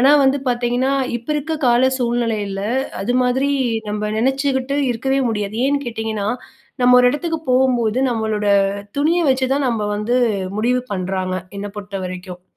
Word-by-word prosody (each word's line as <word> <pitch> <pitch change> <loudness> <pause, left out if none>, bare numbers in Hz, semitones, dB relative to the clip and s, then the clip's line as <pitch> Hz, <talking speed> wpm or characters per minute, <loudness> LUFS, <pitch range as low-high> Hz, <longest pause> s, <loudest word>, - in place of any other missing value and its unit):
ஆனா, 270 +3 +6
வந்து 270 +1 +2
பாத்தீங்கன்னா, 245 +2 0 0.3
இப்போ 240 +5 -8
இருக்க 315 +2 -2
கால 245 +2 +4
சூழ்நிலையில, 230 -5 -1 0.4
அது 245 +5 -1
மாதிரி 260 +3 +1 0.4
நம்ப 210 0 -2
நினைச்சுக்கிட்டு 270 +2 0
இருக்கவே 265 +3 0
முடியாது, 210 -1 -3
ஏன்னு 285 0 +1
கேட்டிங்கன்னா, 220 -3 -3 0.5
நம்ம 250 0 +6
ஒரு 250 - +5
இடத்துக்கு 325 +2 -2
போகும்போது, 250 -3 +2
நம்மளோட 220 -2 -1 0.5
துணிய 325 +5 +2
வச்சு 260 0 +1
தான் 280 -1 0
நம்ப 230 -3 -1
வந்து, 215 +4 0 0.4
முடிவு 250 +3 +1
பண்றாங்க 185 0 -2 0.2
என்ன 200 - -4
பொறுத்தவரைக்கும். 185 -3 -6
240 Hz, 140 wpm, -19 LUFS, 210-265 Hz, 0.5 s, ஆனா